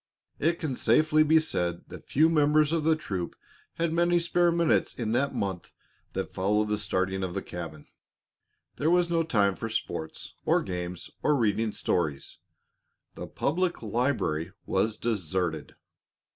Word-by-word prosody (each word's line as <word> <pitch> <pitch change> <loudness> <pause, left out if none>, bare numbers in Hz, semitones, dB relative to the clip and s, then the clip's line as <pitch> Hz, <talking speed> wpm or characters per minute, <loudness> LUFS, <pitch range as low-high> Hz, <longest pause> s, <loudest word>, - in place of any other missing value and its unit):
It 165 +3 +2
can 145 -5 -2
safely 155 +7 +3
be 155 +1 +5
said 90 - -2
that - - -11
few 155 +4 +4
members 150 -1 +3
of 165 -2 +1
the 160 +1 +4
troop 95 - -4 0.4
had 165 -1 0
many 175 +1 +3
spare 175 0 +2
minutes 170 -1 +2
in 115 -3 -2
the 140 +4 +2
month 95 -3 -4 0.4
that - - -4
followed 105 +3 +1
the 105 -1 0
starting 95 -2 -1
of 95 -1 -3
the 100 - -1
cabin. 80 -4 -7 0.9
There 150 - +1
was 175 0 +3
no 165 -1 +3
time 105 -11 +2
for 115 - -5
sports 85 -7 -4
or - - +2
games 90 -1 -5
or 150 - +3
reading 110 -3 +1
stories. 75 -8 -2 0.7
The - - -7
public 175 0 -1
library 100 - -1
was 105 +3 0
deserted. 90 -8 -2
115 Hz, 150 wpm, -28 LUFS, -, 0.9 s, be